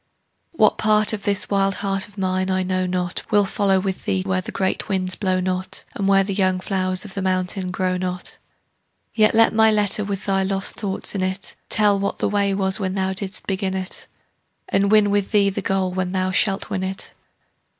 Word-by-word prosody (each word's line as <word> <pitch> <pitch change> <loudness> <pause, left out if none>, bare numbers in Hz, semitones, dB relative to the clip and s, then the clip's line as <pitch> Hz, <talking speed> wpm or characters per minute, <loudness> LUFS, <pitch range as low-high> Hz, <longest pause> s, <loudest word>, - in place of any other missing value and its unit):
What 215 -10 +3
part 215 0 +4
of 205 -2 -5
this 200 -2 +2
wild 195 0 +2
heart 195 -1 -2
of 205 0 -21
mine 185 0 -1
I 185 0 +1
know 185 0 -1
not 180 -1 -2
Will 205 -1 +3
follow 195 -1 +1
with 190 0 -4
thee 95 -1 0
where 95 -1 -1
the - - -7
great 190 +2 -1
winds 185 -2 -1
blow 185 -1 0
not, 185 0 -3
And 195 - -2
where 195 0 +4
the 195 +1 -3
young 185 -1 +1
flowers 185 0 0
of 200 - -8
the 200 - -3
mountain 185 0 -1
grow 185 0 -1
not. 180 0 -4 0.7
Yet 215 -1 +3
let 225 0 +5
my 220 0 +5
letter 210 -1 +2
with 200 0 -4
thy 195 -1 +1
lost 195 0 -1
thoughts 195 -3 -3
in 195 - -2
it 185 +1 -4
Tell 205 -2 +4
what 200 - -2
the - - 0
way 200 -1 +1
was 190 +1 +1
when 190 -2 -2
thou 190 -1 0
didst 190 0 -2
begin 190 -1 -2
it, 190 0 -5 0.6
And 200 +1 +1
win 210 -1 +4
with 205 -1 0
thee 200 -2 +3
the - - -4
goal 190 -1 0
when 185 0 -2
thou 185 0 0
shalt 195 +1 0
win 190 -2 -1
it. 190 0 -4
195 Hz, 210 wpm, -21 LUFS, 185-200 Hz, 0.7 s, let